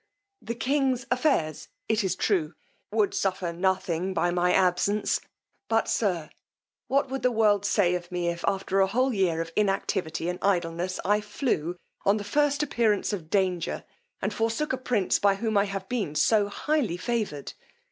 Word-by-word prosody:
The 235 Hz, -, -4 dB
king's 260 Hz, +1 st, 0 dB
affairs, 250 Hz, -, +1 dB, 0.2 s
it 220 Hz, -1 st, +1 dB
is 190 Hz, -, 0 dB
true, 175 Hz, -6 st, 0 dB, 0.4 s
would 210 Hz, -1 st, +2 dB
suffer 185 Hz, -3 st, -1 dB
nothing 185 Hz, 0 st, 0 dB
by 175 Hz, -, +2 dB
my 180 Hz, 0 st, +2 dB
absence; 190 Hz, +3 st, +2 dB, 0.5 s
but, 225 Hz, 0 st, +2 dB
sir, 180 Hz, -8 st, 0 dB, 0.6 s
what 275 Hz, 0 st, +1 dB
would 270 Hz, -1 st, -2 dB
the 250 Hz, -, +2 dB
world 210 Hz, -3 st, +3 dB
say 185 Hz, -5 st, +3 dB
of 175 Hz, 0 st, -4 dB
me, 175 Hz, -1 st, -1 dB
if, 170 Hz, 0 st, -2 dB
after 195 Hz, 0 st, 0 dB
a 190 Hz, -, +5 dB
whole 255 Hz, +6 st, +1 dB
year 180 Hz, -5 st, +1 dB
of 165 Hz, -, -5 dB
inactivity 195 Hz, -5 st, 0 dB
and 180 Hz, 0 st, -2 dB
idleness, 175 Hz, -1 st, 0 dB
I 205 Hz, +2 st, +3 dB
flew, 205 Hz, -, -2 dB, 0.3 s
on 200 Hz, +2 st, +3 dB
the 205 Hz, -, -4 dB
first 290 Hz, +7 st, +1 dB
appearance 225 Hz, -7 st, +1 dB
of 165 Hz, -6 st, -5 dB
danger, 185 Hz, -3 st, 0 dB, 0.4 s
and 200 Hz, +2 st, 0 dB
forsook 230 Hz, +7 st, -1 dB
a -, -, 0 dB
prince, 235 Hz, -7 st, +1 dB
by 200 Hz, -1 st, +4 dB
whom 220 Hz, +2 st, -2 dB
I 200 Hz, 0 st, +4 dB
have 195 Hz, -1 st, -5 dB
been 210 Hz, -11 st, -2 dB
so 200 Hz, +8 st, +3 dB
highly 245 Hz, -, -1 dB
favoured? 205 Hz, -, -3 dB
200 Hz, 165 wpm, -27 LUFS, 180-225 Hz, 0.6 s, a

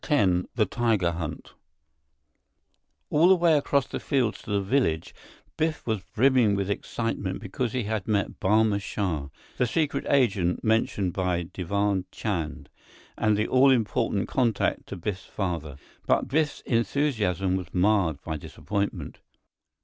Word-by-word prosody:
X 95 Hz, -, +3 dB
The 110 Hz, -3 st, +3 dB
Tiger 110 Hz, -5 st, +1 dB
Hunt 80 Hz, -2 st, -6 dB, 1.6 s
All 160 Hz, +4 st, +5 dB
the 190 Hz, -, +7 dB
way 170 Hz, -3 st, +4 dB
across 140 Hz, -2 st, +2 dB
the -, -, -5 dB
fields 125 Hz, -8 st, 0 dB
to -, -, -12 dB
the 100 Hz, -1 st, +1 dB
village, 95 Hz, -, 0 dB, 0.4 s
Biff 160 Hz, 0 st, -1 dB
was 110 Hz, -4 st, -1 dB
brimming 125 Hz, -4 st, +4 dB
with 100 Hz, 0 st, -1 dB
excitement 100 Hz, -3 st, -3 dB
because 110 Hz, +3 st, -3 dB
they 125 Hz, -2 st, -1 dB
had 105 Hz, -2 st, -3 dB
met 105 Hz, -3 st, -1 dB
Barma 105 Hz, +1 st, +3 dB
Shah, 90 Hz, -8 st, -2 dB, 0.3 s
the 125 Hz, -, +2 dB
secret 145 Hz, +1 st, -1 dB
agent 100 Hz, -10 st, +2 dB
mentioned 110 Hz, -4 st, +1 dB
by 90 Hz, -2 st, 0 dB
Diwan 100 Hz, +1 st, 0 dB
Chand, 85 Hz, -8 st, -3 dB, 0.5 s
and 110 Hz, -2 st, +2 dB
the 105 Hz, -, +1 dB
all 130 Hz, +2 st, +5 dB
important 110 Hz, -4 st, +1 dB
contact 120 Hz, -5 st, 0 dB
to -, -, -6 dB
Biff's 95 Hz, +1 st, -4 dB
father. 85 Hz, -8 st, -4 dB, 0.3 s
But -, -, +2 dB
Biff's 150 Hz, +2 st, 0 dB
enthusiasm 110 Hz, -, 0 dB
was 90 Hz, -1 st, -4 dB
marred 90 Hz, -6 st, +2 dB
by 80 Hz, -1 st, -3 dB
disappointment. 100 Hz, +6 st, -4 dB
105 Hz, 140 wpm, -26 LUFS, 95-125 Hz, 1.6 s, the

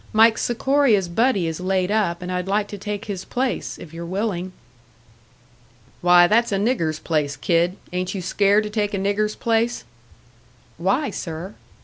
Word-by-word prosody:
Mike 225 Hz, +1 st, +5 dB
Sikoria's 240 Hz, -5 st, +2 dB
buddy 205 Hz, +1 st, +1 dB
is 160 Hz, 0 st, -3 dB
laid 185 Hz, +1 st, 0 dB
up, 185 Hz, -5 st, 0 dB
and 180 Hz, -, -4 dB
I'd 180 Hz, 0 st, -2 dB
like 205 Hz, +1 st, +1 dB
to 205 Hz, -, -6 dB
take 205 Hz, +2 st, -5 dB
his 195 Hz, -3 st, -5 dB
place, 255 Hz, 0 st, -2 dB
if 165 Hz, -2 st, -12 dB
you're 170 Hz, +1 st, -6 dB
willing." 185 Hz, 0 st, -3 dB, 1.5 s
"Why, 175 Hz, 0 st, +7 dB
that's 230 Hz, +5 st, +2 dB
a 200 Hz, -, +1 dB
nigger's 195 Hz, -, 0 dB
place, 150 Hz, -3 st, -1 dB
kid. 170 Hz, +5 st, +1 dB, 0.2 s
Ain't 185 Hz, +2 st, -2 dB
you 190 Hz, -, -3 dB
scared 200 Hz, +3 st, +3 dB
to 210 Hz, -, -5 dB
take 210 Hz, -1 st, -1 dB
a -, -, -1 dB
nigger's 205 Hz, +2 st, 0 dB
place?" 230 Hz, -, 0 dB, 1.0 s
"Why, 195 Hz, -, +1 dB
sir?" 170 Hz, +4 st, -6 dB
195 Hz, 160 wpm, -22 LUFS, 175-215 Hz, 1.5 s, Why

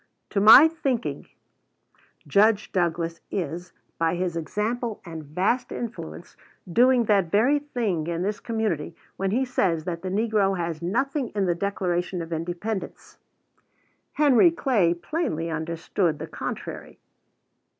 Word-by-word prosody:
To 200 Hz, -, +1 dB
my 225 Hz, +9 st, +10 dB
thinking, 275 Hz, -7 st, -3 dB, 1.0 s
Judge 210 Hz, +1 st, +3 dB
Douglas 170 Hz, -2 st, -1 dB
is, 175 Hz, -1 st, -4 dB, 0.3 s
by 165 Hz, +1 st, +1 dB
his 175 Hz, -1 st, -2 dB
example 215 Hz, -, -2 dB
and 165 Hz, -2 st, -7 dB
vast 185 Hz, -, -1 dB
influence, 80 Hz, -, -7 dB, 0.3 s
doing 245 Hz, +7 st, +4 dB
that 200 Hz, -5 st, +2 dB
very 245 Hz, -, +3 dB
thing 225 Hz, -, -2 dB
in 170 Hz, +1 st, -2 dB
this 205 Hz, +2 st, -2 dB
community 210 Hz, -9 st, -2 dB, 0.2 s
when 195 Hz, 0 st, -1 dB
he 250 Hz, +7 st, +1 dB
says 175 Hz, -10 st, 0 dB
that 170 Hz, 0 st, -4 dB
the 185 Hz, -, -4 dB
negro 205 Hz, -1 st, +1 dB
has 170 Hz, -2 st, -3 dB
nothing 260 Hz, -, -1 dB
in 200 Hz, -2 st, +1 dB
the 175 Hz, -, +2 dB
Declaration 180 Hz, -1 st, -2 dB
of 165 Hz, 0 st, -6 dB
Independence. 175 Hz, +6 st, -5 dB, 0.9 s
Henry 295 Hz, +2 st, +5 dB
Clay 230 Hz, -, +1 dB
plainly 175 Hz, -, -3 dB
understood 165 Hz, +1 st, -1 dB
the 160 Hz, -, -6 dB
contrary. -, -, -7 dB
190 Hz, 130 wpm, -25 LUFS, 170-230 Hz, 1.0 s, my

